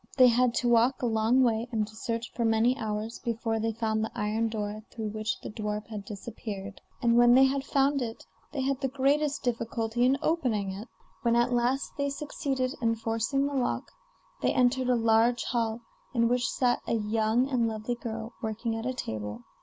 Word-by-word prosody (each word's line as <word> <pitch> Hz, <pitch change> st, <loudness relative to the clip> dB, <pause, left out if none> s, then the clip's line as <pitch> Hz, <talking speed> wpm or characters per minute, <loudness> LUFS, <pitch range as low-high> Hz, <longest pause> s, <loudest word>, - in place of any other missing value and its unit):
They 255 Hz, -2 st, +8 dB
had 245 Hz, 0 st, +3 dB
to 245 Hz, -, +1 dB
walk 240 Hz, +3 st, +3 dB
a -, -, +3 dB
long 225 Hz, +3 st, +3 dB
way, 230 Hz, -1 st, +1 dB
and 215 Hz, -3 st, 0 dB
to 215 Hz, -, -14 dB
search 230 Hz, +1 st, -3 dB
for 235 Hz, -, -1 dB
many 225 Hz, +2 st, +3 dB
hours, 220 Hz, 0 st, -4 dB
before 225 Hz, -1 st, -2 dB
they 225 Hz, +1 st, 0 dB
found 220 Hz, -1 st, -1 dB
the 220 Hz, -, -2 dB
iron 215 Hz, +2 st, 0 dB
door 210 Hz, -1 st, -4 dB
through 220 Hz, -2 st, -4 dB
which 215 Hz, +1 st, -3 dB
the -, -, -6 dB
dwarf 210 Hz, 0 st, -3 dB
had 210 Hz, -3 st, -6 dB
disappeared; 200 Hz, -1 st, -7 dB, 0.2 s
and 235 Hz, 0 st, +4 dB
when 240 Hz, 0 st, +7 dB
they 265 Hz, -, +7 dB
had 270 Hz, 0 st, +2 dB
found 275 Hz, 0 st, +2 dB
it 230 Hz, -2 st, -5 dB, 0.3 s
they 280 Hz, -2 st, -2 dB
had 270 Hz, +1 st, -1 dB
the 270 Hz, -, +1 dB
greatest 285 Hz, +2 st, +1 dB
difficulty 230 Hz, -1 st, -1 dB
in 260 Hz, +2 st, +4 dB
opening 235 Hz, -, 0 dB
it. 200 Hz, +5 st, -7 dB, 0.3 s
When 235 Hz, -1 st, +2 dB
at 240 Hz, +1 st, +2 dB
last 245 Hz, +3 st, +1 dB
they 280 Hz, 0 st, +1 dB
succeeded 275 Hz, -3 st, -2 dB
in 230 Hz, -1 st, +2 dB
forcing 225 Hz, +5 st, 0 dB
the 285 Hz, -, -2 dB
lock, 260 Hz, -3 st, -1 dB, 0.5 s
they -, -, +2 dB
entered 255 Hz, 0 st, +2 dB
a 250 Hz, -, +4 dB
large 230 Hz, +1 st, +3 dB
hall, 230 Hz, -1 st, -1 dB, 0.3 s
in 230 Hz, -1 st, +4 dB
which 245 Hz, 0 st, +1 dB
sat 245 Hz, -2 st, +1 dB
a -, -, +1 dB
young 220 Hz, +3 st, +1 dB
and 250 Hz, -4 st, +1 dB
lovely 220 Hz, +2 st, -3 dB
girl, 225 Hz, -1 st, -6 dB
working 225 Hz, 0 st, -2 dB
at 225 Hz, +2 st, -3 dB
a 255 Hz, -, -2 dB
table. 110 Hz, -, -5 dB
230 Hz, 200 wpm, -28 LUFS, 220-255 Hz, 0.5 s, They